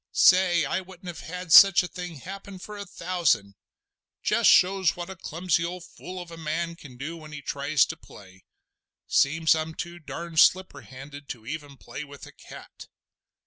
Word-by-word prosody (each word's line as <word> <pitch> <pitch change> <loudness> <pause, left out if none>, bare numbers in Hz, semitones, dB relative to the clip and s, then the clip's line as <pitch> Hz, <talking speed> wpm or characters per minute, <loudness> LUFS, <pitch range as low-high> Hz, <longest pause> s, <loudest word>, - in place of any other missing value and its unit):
Say! 180 -4 +5
I 170 +7 -1
wouldn't 185 0 -11
have 175 - -8
had 180 0 -7
such 195 -2 +9
a - - -4
thing 180 -2 -7
happen 195 +6 -9
for 210 +3 -9
a 200 -1 -7
thousand! 165 - 0 0.7
Just - - +3
shows 190 -1 +4
what 175 +1 -6
a - - -8
clumsy 175 -1 -1
fool 180 +1 -7
of 175 -1 -9
a 165 - -9
man 165 +2 -3
can 140 -7 -13
do 150 +6 -6
when 155 -1 -12
he 145 -1 -8
tries 140 +2 +1
to - - -6
play! 95 -2 -16 0.6
Seems 160 +3 +3
I'm 160 0 -3
too 175 0 -6
darned 165 0 -4
slipperhanded 145 -6 0
to 115 -3 -8
even 145 0 -7
play 140 - -8
with 140 -1 -12
a - - -13
cat. - - -13
170 Hz, 175 wpm, -26 LUFS, 145-180 Hz, 0.7 s, such